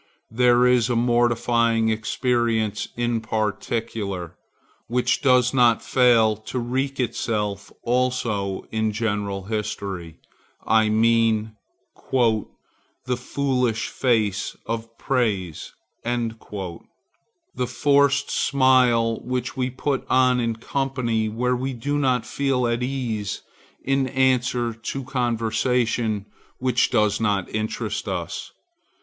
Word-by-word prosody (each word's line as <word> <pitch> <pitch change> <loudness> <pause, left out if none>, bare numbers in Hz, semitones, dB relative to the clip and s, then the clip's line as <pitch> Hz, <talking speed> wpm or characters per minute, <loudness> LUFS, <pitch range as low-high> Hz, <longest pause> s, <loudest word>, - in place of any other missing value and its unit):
There 125 +1 +4
is 125 -1 +3
a 120 - +1
mortifying 120 -1 +2
experience 110 -1 0
in 120 -1 0
particular, 105 -4 -3 0.5
which 125 +1 +1
does 125 -2 +4
not 120 -3 +4
fail 115 -4 +4
to 110 +4 -6
wreak 130 +3 -2
itself 105 -4 -2
also 120 -6 0
in 110 0 0
the 105 - -2
general 105 -3 -2
history; 95 -5 -4 0.5
I 110 0 +3
mean 110 0 +2 0.6
"the 115 -5 +2 0.7
foolish 125 -2 -1
face 110 -6 0
of 115 0 -5
praise," 105 - -1 0.3
the 115 0 -6
forced 140 +2 +2
smile 125 -4 +3
which 125 -1 -3
we 130 -1 -1
put 135 +1 -2
on 130 -1 +4
in 115 -1 0
company 120 -3 -1
where 125 +3 0
we 130 +2 -3
do 145 +5 -2
not 125 -4 +1
feel 135 -3 0
at 120 0 0
ease 120 -6 -3 0.4
in 135 0 +1
answer 125 -2 +1
to 115 +4 -5
conversation 120 -3 0 0.3
which 125 -2 +1
does 105 -4 +2
not 100 -4 +1
interest 110 0 -3
us. - - -4
120 Hz, 105 wpm, -23 LUFS, 110-125 Hz, 0.7 s, There